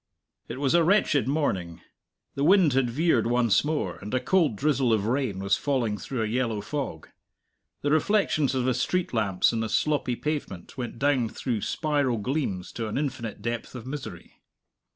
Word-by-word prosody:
It - - -6
was 140 -2 +1
a 170 -1 +5
wretched 160 - +3
morning. 95 - -1 0.5
The 140 - -2
wind 175 -3 +5
had 130 -2 +2
veered 135 -3 +2
once 120 -3 +3
more, 150 0 -2
and 105 - -8
a - - +3
cold 155 - +2
drizzle 135 -1 +1
of 105 -2 +2
rain 120 -4 0
was 100 +1 +1
falling 125 -7 0
through 125 -4 -3
a - - -1
yellow 115 -1 -1
fog. 115 - -5 0.7
The 145 - +1
reflections 155 -4 +2
of 130 -1 0
the 130 - +2
street 175 +8 -1
lamps 105 -2 +2
in 115 - -1
the 110 -1 -2
sloppy 145 -1 +1
pavement 140 - -4
went 120 -2 -5
down 130 -3 +1
through 115 -3 -3
spiral 145 -5 0
gleams 105 -6 -2
to 115 -2 -4
an 105 - -3
infinite 120 -7 -4
depth 120 +2 -4
of 120 - -7
misery. 130 - -8
130 Hz, 175 wpm, -26 LUFS, 110-145 Hz, 0.7 s, a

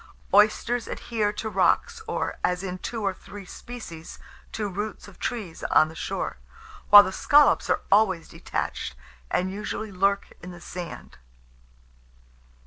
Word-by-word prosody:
Oysters 215 +3 +3
adhere 215 -3 -1
to 220 - -4
rocks, 205 - +1
or, - - -3
as 180 +1 0
in 185 -1 -4
two 225 +3 -4
or 195 -1 +1
three 200 +1 -11
species, 180 -7 -9 0.3
to 215 -2 -2
roots 205 +3 -5
of 200 - -15
trees 205 -9 -4
on 155 - +4
the 160 - -12
shore; - - -3 0.5
while 205 0 +11
the 190 - -3
scallops 290 +9 +4
are - - +2
always 195 -5 +3
detached, 65 - -4 0.3
and 185 +1 0
usually 210 +1 -4
lurk 195 +1 +1
in 180 - -8
the 175 -1 -10
sand. 175 - -8
200 Hz, 140 wpm, -26 LUFS, 180-215 Hz, 0.5 s, while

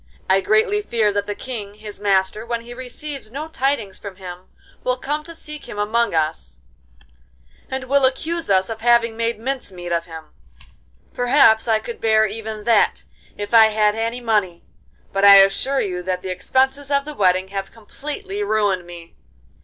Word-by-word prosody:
I 190 +1 +4
greatly 420 - +2
fear 225 - 0
that 205 0 -1
the 205 - -3
King, 210 -5 -7
his 210 -1 -10
master, 195 +1 +1
when 235 0 -3
he 240 +1 -10
receives 260 0 -7
no 295 +5 -5
tidings 270 -9 -2
from 200 -2 -8
him, 185 -1 -10 0.4
will 250 0 0
come 295 +4 -3
to 335 0 -9
seek 300 -2 -10
him - - -7
among 215 -1 +1
us, 155 - -2 1.1
and 265 0 -3
will 275 +1 +2
accuse 325 +5 -1
us 190 -1 +3
of 225 -1 -6
having 235 -1 +3
made 230 -1 -1
mince 260 -2 -4
meat 175 -1 -8
of 170 0 0
him. 160 -2 -11 0.8
Perhaps 245 -3 +4
I 220 -1 +3
could 230 +2 -8
bear 220 -1 +4
even 215 0 -5
that 230 -1 +2 0.3
if 205 +2 -6
I 225 -1 +8
had 210 -1 +2
any 230 +2 -3
money, 205 -7 0 0.5
but 195 0 0
I 200 0 +10
assure 195 +8 +4
you 180 -3 -3
that 180 0 -3
the 185 - -4
expenses 265 +9 0
of 280 -1 +1
the 300 - -6
wedding 185 -5 +2
have 195 0 -5
completely 300 - -7
ruined 205 - 0
me. 170 -1 -11
220 Hz, 175 wpm, -21 LUFS, 195-260 Hz, 1.1 s, I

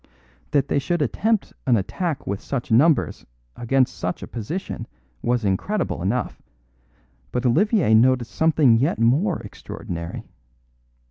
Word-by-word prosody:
"That 140 -2 +1
they - - +1
should 170 +3 0
attempt 215 - 0
an 120 -3 +5
attack 150 - -3
with 100 0 -3
such 120 -4 -4
numbers 145 +7 +3 0.3
against 125 -3 +1
such 90 +1 -4
a - - -6
position 125 - -5 0.3
was 120 -2 0
incredible 130 - -1
enough; 105 +8 -2 0.9
but 125 +1 -2
Olivier 170 - +3
noticed 120 0 +4
something 150 -4 +4
yet 145 +8 +1
more 145 - +2
extraordinary. 85 -4 -7
125 Hz, 125 wpm, -23 LUFS, 110-160 Hz, 0.9 s, an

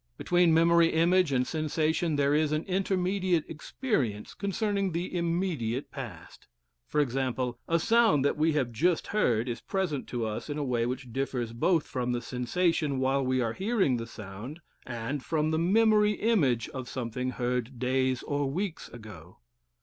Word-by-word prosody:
Between 175 -1 +3
memory 170 +1 +5
image 170 0 +3
and 125 -1 +2
sensation 155 +1 0
there 140 0 +2
is 150 0 +2
an 155 +1 0
intermediate 185 -2 0
experience 145 - -2
concerning 200 -1 -1
the 175 +2 -3
immediate 165 -8 -1
past. 115 - -9 0.4
For - - 0
example, 130 -2 -1
a 165 - +3
sound 220 - +3
that - - +2
we 155 +1 +2
have 135 -5 0
just 165 +9 +1
heard 120 - +1
is 120 -2 -4
present 180 -8 -2
to 120 -2 -2
us 110 +6 -4
in 145 - -3
a 150 - -1
way 120 -3 0
which 125 -1 -5
differs 125 -3 -2
both 160 +7 +2
from 125 -2 -2
the 120 - -2
sensation 145 +4 0
while 135 +1 +1
we 130 0 +1
are 115 -2 -1
hearing 195 - +1
the 115 0 -5
sound 110 - -9 0.3
and 125 +3 -4
from 155 -1 0
the 160 - +1
memory 210 +3 +4
image 155 - +1
of 130 -2 -7
something 125 0 -3
heard 125 0 -2
days 130 +1 0
or 145 -1 -1
weeks 180 +4 -4
ago. 100 -8 -12
145 Hz, 165 wpm, -29 LUFS, 125-175 Hz, 0.4 s, memory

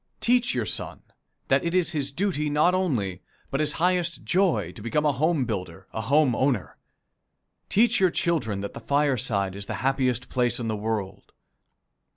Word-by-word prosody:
Teach 245 - +2
your 120 -3 0
son 90 - -3 0.4
that 135 +1 +3
it 170 +1 -1
is 180 -2 +3
his 140 -4 -2
duty 155 -2 -1
not 150 +5 +3
only, 115 - -1 0.3
but 135 - -1
his 150 0 +2
highest 175 -1 0
joy, 170 - +1
to 105 - -11
become 150 +8 0
a 150 - +4
home 150 +1 +1
builder, 95 -5 -5
a 110 - -3
home 140 0 +3
owner. 130 -7 0 0.9
Teach 235 +3 +3
your 185 -1 +4
children 130 - -1
that 100 - -5
the - - -7
fireside 125 -9 0
is 100 0 -7
the - - -3
happiest 130 -2 +1
place 125 -1 +1
in 115 -2 -3
this 110 - -1
world. 105 -2 -4
135 Hz, 175 wpm, -25 LUFS, 110-170 Hz, 0.9 s, a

